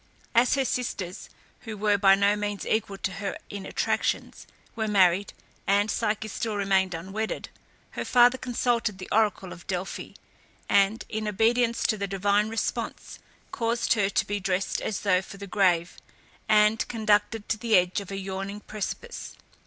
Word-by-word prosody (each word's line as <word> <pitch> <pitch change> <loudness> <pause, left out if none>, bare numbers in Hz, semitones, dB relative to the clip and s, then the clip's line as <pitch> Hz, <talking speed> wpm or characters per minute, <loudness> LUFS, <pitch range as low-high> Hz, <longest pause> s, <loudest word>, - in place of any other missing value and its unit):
As 240 +2 +4
her 270 -1 +1
sisters, 195 -8 -3 0.3
who 220 -3 -7
were 205 0 +2
by 195 -1 +6
no 200 +1 +3
means 205 -1 -3
equal 200 -3 -1
to 190 - -2
her 200 0 -4
in 200 -1 -6
attractions, - - -1 0.3
were 220 -2 -1
married, 195 -1 +3 0.4
and 205 +2 +3
Psyche 215 +1 -1
still 220 +1 -3
remained 190 -2 +1
unwedded, 195 +6 -4 0.4
her - - -4
father 245 +1 +5
consulted 235 -4 0
the 185 - -8
oracle 210 -3 +1
of 175 - -14
Delphi, 185 0 -4 0.5
and, 200 +3 +3
in 215 0 -3
obedience 230 +3 +2
to 215 - +1
the 200 - -1
divine 200 +2 +1
response, 225 0 -4 0.3
caused 230 0 +1
her 205 -4 +1
to - - +1
be 205 0 -2
dressed 190 0 -1
as 210 - -3
though 185 -3 +3
for 195 - -11
the 200 - -7
grave, 180 -4 +1 0.5
and 215 +1 +4
conducted 215 -1 +1
to 220 - +1
the 230 -2 +2
edge 180 +2 +1
of 195 - -10
a 195 - -4
yawning 195 +1 -5
precipice. 215 - -6
205 Hz, 160 wpm, -27 LUFS, 195-220 Hz, 0.5 s, by